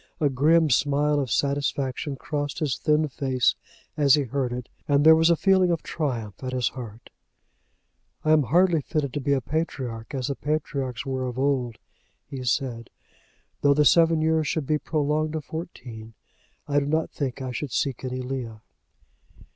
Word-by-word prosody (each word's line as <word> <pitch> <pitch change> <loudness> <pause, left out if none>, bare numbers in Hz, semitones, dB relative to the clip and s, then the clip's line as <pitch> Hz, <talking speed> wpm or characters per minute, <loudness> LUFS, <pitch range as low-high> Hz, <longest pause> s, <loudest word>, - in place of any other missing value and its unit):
A 145 -3 +2
grim 155 +4 +3
smile 145 +2 +2
of 130 -5 -2
satisfaction 140 +1 -1
crossed 145 +2 -4
his 150 -5 -1
thin 155 0 +2
face 130 -3 +1 0.4
as 145 -2 +5
he 145 - +1
heard 130 0 -2
it, 125 0 -5 0.2
and 145 0 +3
there 160 0 +9
was 160 +1 +4
a 170 - +5
feeling 190 +1 +3
of 170 -2 -1
triumph 120 - -4
at 130 0 -4
his 125 -2 +1
heart. 115 -3 -10 1.1
"I 155 - +3
am 155 -1 +6
hardly 170 +4 +3
fitted 140 -2 -2
to 145 - -2
be 140 +1 +1
a 135 - +1
patriarch, 130 -6 -4
as 130 -2 -2
the - - 0
patriarchs 140 -5 -3
were 130 -1 -2
of 125 0 -6
old," 130 -4 0 0.5
he 135 -2 -7
said. 120 -2 -2 0.7
"Though 140 0 +4
the 150 0 +3
seven 165 0 +5
years 160 -1 +2
should 155 0 -1
be 150 +2 +1
prolonged 155 0 -1
to 160 - -2
fourteen 120 -9 -8 0.5
I 145 0 +2
do 140 - -3
not 155 +2 0
think 135 -2 -3
I 130 -1 -4
should 130 +2 -4
seek 135 +1 -1
any 130 0 -3
Leah." 125 -4 -5
140 Hz, 175 wpm, -25 LUFS, 130-155 Hz, 1.1 s, there